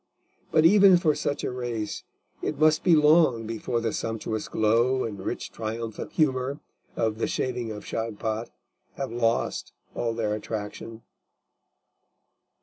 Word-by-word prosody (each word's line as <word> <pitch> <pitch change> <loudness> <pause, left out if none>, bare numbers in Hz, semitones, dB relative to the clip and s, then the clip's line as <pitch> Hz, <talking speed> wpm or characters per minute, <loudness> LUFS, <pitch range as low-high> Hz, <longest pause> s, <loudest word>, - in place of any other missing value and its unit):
But 155 0 +4
even 195 0 +7
for 165 -4 +2
such 145 0 -2
a - - -1
race 120 -4 -4 0.4
it 150 - -2
must 155 +1 +4
be 175 -3 +6
long 150 -6 +4
before 115 +2 -2
the 115 -1 -2
sumptuous 110 -1 -3
glow 120 +4 +2
and 105 -3 -5
rich - - -4
triumphant 110 0 -5
humour 135 -2 +1 0.4
of 110 -1 -1
The - - 0
Shaving 120 -3 -2
of 105 -1 -8
Shagpat 110 0 -3 0.5
have 135 -3 -4
lost 115 -1 -1 0.2
all 115 -1 -2
their 110 -2 -1
attraction. 110 +1 -6
115 Hz, 135 wpm, -26 LUFS, 110-140 Hz, 0.5 s, even